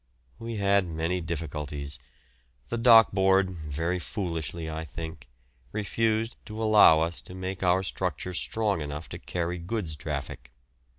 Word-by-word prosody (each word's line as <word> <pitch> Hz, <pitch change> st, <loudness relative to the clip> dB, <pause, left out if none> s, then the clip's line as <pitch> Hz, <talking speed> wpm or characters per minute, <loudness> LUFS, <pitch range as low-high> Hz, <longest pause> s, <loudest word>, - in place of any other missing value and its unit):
We 115 Hz, 0 st, -5 dB
had 100 Hz, -2 st, +3 dB
many 85 Hz, +2 st, -1 dB
difficulties. 75 Hz, -3 st, -5 dB, 0.7 s
The -, -, -1 dB
Dock 115 Hz, -1 st, +8 dB
Board, 95 Hz, 0 st, +3 dB
very 80 Hz, +2 st, -2 dB
foolishly 85 Hz, -, -4 dB
I 80 Hz, 0 st, -4 dB
think, 80 Hz, -3 st, -8 dB, 0.4 s
refused 110 Hz, +2 st, 0 dB
to 110 Hz, 0 st, -7 dB
allow 105 Hz, -8 st, +7 dB
us 85 Hz, 0 st, -1 dB
to 90 Hz, -, -11 dB
make 95 Hz, 0 st, -5 dB
our 95 Hz, 0 st, +3 dB
structure 90 Hz, 0 st, -3 dB
strong 100 Hz, +1 st, 0 dB
enough 75 Hz, +2 st, -5 dB
to -, -, -7 dB
carry 90 Hz, 0 st, -3 dB
goods 85 Hz, -3 st, -3 dB
traffic. 70 Hz, -5 st, -5 dB
90 Hz, 135 wpm, -28 LUFS, 80-100 Hz, 0.7 s, Dock